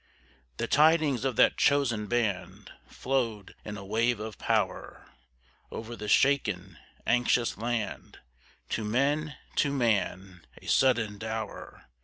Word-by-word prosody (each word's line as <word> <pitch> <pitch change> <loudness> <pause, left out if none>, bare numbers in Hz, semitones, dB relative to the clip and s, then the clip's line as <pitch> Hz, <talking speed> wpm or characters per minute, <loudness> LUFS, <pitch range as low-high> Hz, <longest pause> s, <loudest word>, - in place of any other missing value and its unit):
The - - -1
tidings 150 -4 +4
of 130 -3 0
that - - +4
chosen 120 -7 +2
band 100 -6 -2 0.2
Flowed 115 -7 -2
in 105 -1 -6
a 100 - -9
wave 115 +3 +1
of 110 0 -7
power - - -2 0.6
Over 115 +1 -7
the 105 -1 -7
shaken, 105 - +2 0.3
anxious 120 0 +2
land, 115 0 -4 0.5
To 110 - -2
men, 140 +6 0 0.2
to 140 - +2
man, 95 - -1
a - - -17
sudden 115 -6 +2
dower. 110 0 -6
115 Hz, 120 wpm, -28 LUFS, 105-130 Hz, 0.6 s, tidings